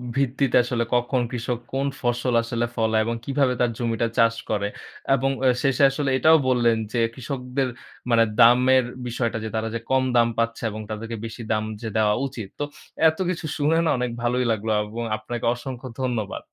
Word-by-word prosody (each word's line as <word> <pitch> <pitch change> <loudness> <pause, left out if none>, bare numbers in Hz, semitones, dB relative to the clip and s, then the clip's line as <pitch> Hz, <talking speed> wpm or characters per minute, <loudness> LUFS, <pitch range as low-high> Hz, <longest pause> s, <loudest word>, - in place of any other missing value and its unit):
ভিত্তিতে 135 -1 +2
আসলে 120 -1 -1
কখন, 120 +1 +1
কৃষক 120 0 -3
কোন 135 +1 0
ফসল 120 0 0
আসলে 120 0 -1
ফলায় 110 -1 +2
এবং 115 0 -1
কিভাবে 135 -2 +1
তার 120 -1 +2
জমিটা 115 -1 0
চাষ 115 0 +4
করে। 100 -1 0 0.5
এবং 135 +1 0 0.2
অ - - +6 0.2
শেষে 135 0 +2
আসলে 140 0 -1
এটাও 160 +3 +6
বললেন 120 -2 +3 0.2
যে, 120 - +1
কৃষকদের 130 +1 -3 0.4
মানে 115 -1 +5 0.2
দামের 125 +2 +6 0.2
বিষয়টা 115 -1 -1
যে 110 - -3
তারা 110 0 -1
যে 115 - -1
কম 130 0 +3
দাম 115 -1 +5
পাচ্ছে 115 0 -1
এবং 110 +1 -6
তাদেরকে 110 +2 -5
বেশি 115 +1 -7
দাম 110 0 +1 0.2
যে 115 - -4
দেওয়া 105 -1 +3
উচিত। 115 -6 -7
তো - - 0 0.5
এতকিছু 175 0 -3
শুনে 155 +3 +2
না, - - +2
অনেক 125 -1 -1
ভালোই 125 +1 +1
লাগলো 110 0 -1
এবং 115 +3 -5
আপনাকে 115 +2 -5
অসংখ্য 130 +1 -7
ধন্যবাদ। 120 -5 -2
120 Hz, 180 wpm, -24 LUFS, 115-130 Hz, 0.5 s, অ